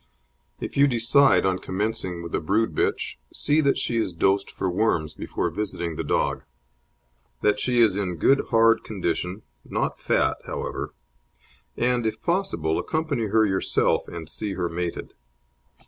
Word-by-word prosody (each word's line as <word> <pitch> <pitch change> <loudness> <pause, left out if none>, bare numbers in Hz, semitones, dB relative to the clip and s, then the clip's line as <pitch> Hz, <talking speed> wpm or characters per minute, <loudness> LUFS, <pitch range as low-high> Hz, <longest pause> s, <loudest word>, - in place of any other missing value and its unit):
If - - -6
you 140 +1 +6
decide 120 +2 +4
on 95 -1 +1
commencing 95 -3 -3
with 85 - -8
a - - +1
brood 110 +8 +1
bitch, - - -1
see 150 +2 +2
that 140 -2 +2
she 120 - -1
is 110 -5 0
dosed 95 +4 +1
for 95 - -3
worms 90 -5 0
before 85 +2 -3
visiting 85 -3 -3
the - - -3
dog; - - 0 1.0
that 105 0 +2
she 125 0 +2
is 105 -4 +4
in 95 -4 -2
good 135 - +3
hard 115 -1 +4
condition 95 -1 -3 0.2
not - - -2
fat, - - +1
however; - - -4 0.8
and, 120 -1 +1
if 110 - -3
possible, 170 - 0
accompany 155 -8 -1
her 110 +2 +3
yourself 95 -2 +1
and 85 -2 -7
see 100 +5 -4
her 90 -2 -2
mated. 85 0 -4
105 Hz, 150 wpm, -25 LUFS, 90-120 Hz, 1.0 s, you